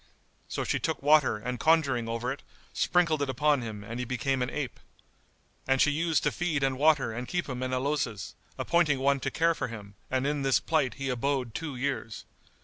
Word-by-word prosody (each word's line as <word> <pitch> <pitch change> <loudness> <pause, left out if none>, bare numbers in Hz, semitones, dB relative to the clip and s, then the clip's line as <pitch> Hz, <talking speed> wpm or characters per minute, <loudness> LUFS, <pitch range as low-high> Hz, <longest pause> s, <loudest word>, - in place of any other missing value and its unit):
So - - -3
she - - 0
took - - -1
water 150 -5 +5
and 125 +4 -4
conjuring 140 -8 +2
over 115 +2 -2
it, 140 - -6 0.3
sprinkled 170 -4 +2
it 140 - 0
upon 145 +2 +2
him 110 -3 -6
and 115 +3 -6
he - - -1
became 130 +2 -1
an 125 - 0
ape. 140 -4 -4 0.9
And 135 0 +3
she 150 - +5
used 160 +1 +1
to - - +2
feed 160 -5 -1
and 135 -1 0
water 145 -6 +3
and 120 +2 -5
keep 175 -1 -2
him 130 -2 -4
in 130 0 -2
a 130 - +1
closet, 130 -7 -2 0.2
appointing 170 -5 +2
one 140 +1 +2
to 135 - -2
care 165 +4 +2
for - - -3
him; 105 -4 -9 0.2
and 130 +1 0
in 145 0 0
this 135 -1 +3
plight 150 -6 0
he 135 0 -3
abode 130 -1 -1
two 160 -2 -4
years. 125 -4 -3
135 Hz, 210 wpm, -28 LUFS, 125-150 Hz, 0.9 s, water